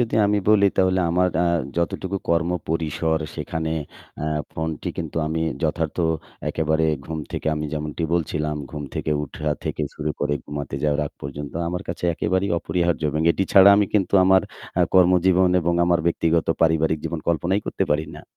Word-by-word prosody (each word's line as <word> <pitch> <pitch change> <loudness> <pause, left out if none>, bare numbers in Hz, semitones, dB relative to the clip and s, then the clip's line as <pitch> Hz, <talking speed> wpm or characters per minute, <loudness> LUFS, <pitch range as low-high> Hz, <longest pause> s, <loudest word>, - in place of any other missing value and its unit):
যদি 115 -2 0
আমি 105 0 +2
বলি 100 -2 +6
তাহলে 95 0 +3
আমার 90 +2 +3
আ - - +3 0.3
যতটুকু 90 +3 -1
কর্ম 85 +1 +2 0.2
পরিসর 80 0 0 0.2
সেখানে 80 -1 -3 0.5
আ - - -1 0.3
ফোনটি 80 -1 -3
কিন্তু 80 -2 -5
আমি 80 +1 -2 0.2
যথার্থ 80 -1 -1 0.5
একেবারে 80 0 +1 0.2
ঘুম 80 +1 -5
থেকে - - -4
আমি 75 0 -3
যেমনটি 75 +1 -4
বলছিলাম, 75 -2 -1
ঘুম 75 -1 -5
থেকে - - -2
ওঠা 75 +1 -4 0.2
থেকে - - -2
শুরু 75 0 -3
করে 75 0 +1
ঘুমাতে 70 -2 -5
যাওয়ার 75 0 +1
আগ - - -10
পর্যন্ত 70 +1 -6 0.2
আমার 90 +2 -3
কাছে - - -4
একেবারেই 95 +4 0
অপরিহার্য 85 -1 0
এবং 75 +2 -1
এটি 95 +3 +1
ছাড়া 95 0 +9
আমি 105 -1 +3
কিন্তু 100 -1 +2
আমার 95 0 +5 0.4
আ - - +4
কর্মজীবন 90 0 +5
এবং 85 0 0
আমার 85 0 +2
ব্যক্তিগত 85 -1 +1 0.2
পারিবারিক 80 -1 +2
জীবন 80 0 -3
কল্পনাই 85 +4 +1
করতে - - -1
পারি 75 +1 0
না। - - -11
80 Hz, 170 wpm, -23 LUFS, 75-90 Hz, 0.5 s, ছাড়া